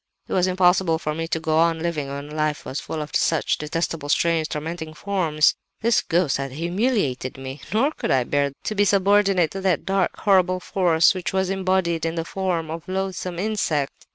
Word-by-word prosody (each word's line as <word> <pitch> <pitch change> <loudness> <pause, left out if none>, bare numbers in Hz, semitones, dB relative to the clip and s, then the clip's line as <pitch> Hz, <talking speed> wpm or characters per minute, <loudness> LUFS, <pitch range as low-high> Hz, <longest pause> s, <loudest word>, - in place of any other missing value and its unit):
"It - - -5
was 185 0 +3
impossible 180 -2 +3
for 155 -1 -3
me 165 +1 -3
to 165 - -1
go 160 0 +1
on 165 0 +3
living 160 -3 -2
when 140 +2 -6
life 155 -1 -1
was 135 - -4
full 155 -1 -4
of 150 - -8
such 160 -2 +1
detestable, 155 -1 -3
strange, 165 0 +2
tormenting 160 +1 -5
forms. 165 -6 +2 0.3
This 235 +1 +3
ghost 170 -4 +1
had 135 -1 -5
humiliated 170 - -1
me;—nor 150 - -2
could - - -4
I 130 -2 +3
bear 140 +2 0
to - - -2
be 205 -1 +2
subordinate 195 -4 +3
to 195 - -5
that 185 -5 +1
dark, 195 -1 0
horrible 185 -3 +3
force 175 -3 +3
which 185 -1 -4
was 190 0 0
embodied 185 -3 0
in 165 0 -1
the 165 -1 -2
form 175 -4 -2
of 165 0 -5
the 185 - -4
loathsome 185 -2 -3
insect. 175 -8 -2
170 Hz, 190 wpm, -23 LUFS, 155-190 Hz, 0.3 s, was